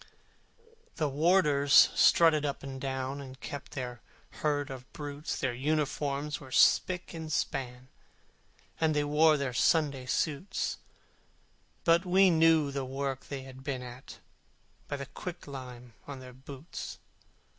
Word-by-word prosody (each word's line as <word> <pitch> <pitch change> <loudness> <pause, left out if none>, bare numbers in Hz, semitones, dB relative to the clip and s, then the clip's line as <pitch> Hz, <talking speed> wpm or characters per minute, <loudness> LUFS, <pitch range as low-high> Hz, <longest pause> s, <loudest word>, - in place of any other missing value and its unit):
The 155 -4 0
warders 145 -1 +2 0.2
strutted 160 -3 +5
up 140 -2 -3
and 135 -1 -7
down, 135 +1 -3
And 130 -1 -10
watched 145 - -7
their 125 -3 -5 0.4
herd 145 -2 0
of 130 -1 -9
brutes, 145 +1 -5
Their 130 -2 -1
uniforms 145 +1 -1
were 130 -3 -12
spick 180 +7 +3
and 160 -2 -6
span, 130 -4 -2 0.9
And 160 -2 +2
they 150 - +2
wore 150 +1 +4
their 135 -3 -2
Sunday 140 -2 +2
suits, 155 +7 -1 1.0
But 170 +1 +4
we 190 0 +5
knew 160 -3 +4
the 135 -1 -3
work 135 0 -4
they 135 -2 -5
had 130 0 -12
been 135 -3 -3
at, 125 +1 -10 0.7
By 145 - -3
the 140 - -5
quicklime 130 -8 -8
on 140 -2 -7
their 130 -1 -11
boots. 135 +4 -8
140 Hz, 135 wpm, -30 LUFS, 130-155 Hz, 1.0 s, strutted